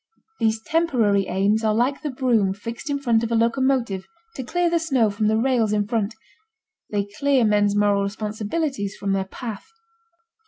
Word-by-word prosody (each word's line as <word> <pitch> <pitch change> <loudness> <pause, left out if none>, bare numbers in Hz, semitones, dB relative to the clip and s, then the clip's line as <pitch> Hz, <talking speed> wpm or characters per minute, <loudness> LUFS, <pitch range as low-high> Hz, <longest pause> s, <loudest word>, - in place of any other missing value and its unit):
These 220 0 0
temporary 235 - +1
aims 205 +4 +1
are 215 -1 +2
like 255 +5 +1
the 300 - -3
broom 235 -7 +1
fixed 230 +8 -7
in 285 - 0
front 235 -5 +1
of 230 - -2
a - - +2
locomotive 235 -4 +1 0.3
to 270 - -5
clear 350 +8 0
the 340 0 +2
snow 265 -10 +1
from 210 +1 0
the 220 +1 +2
rails 230 -3 +1
in 205 -1 0
front: 220 -1 -1 0.7
they 205 -1 -1
clear 280 -4 +3
men's 205 -1 +2
moral 205 -1 +3
responsibilities 210 +3 -3
from 200 -1 -2
their 195 -1 0
path. 220 - -7
225 Hz, 170 wpm, -23 LUFS, 205-260 Hz, 0.7 s, clear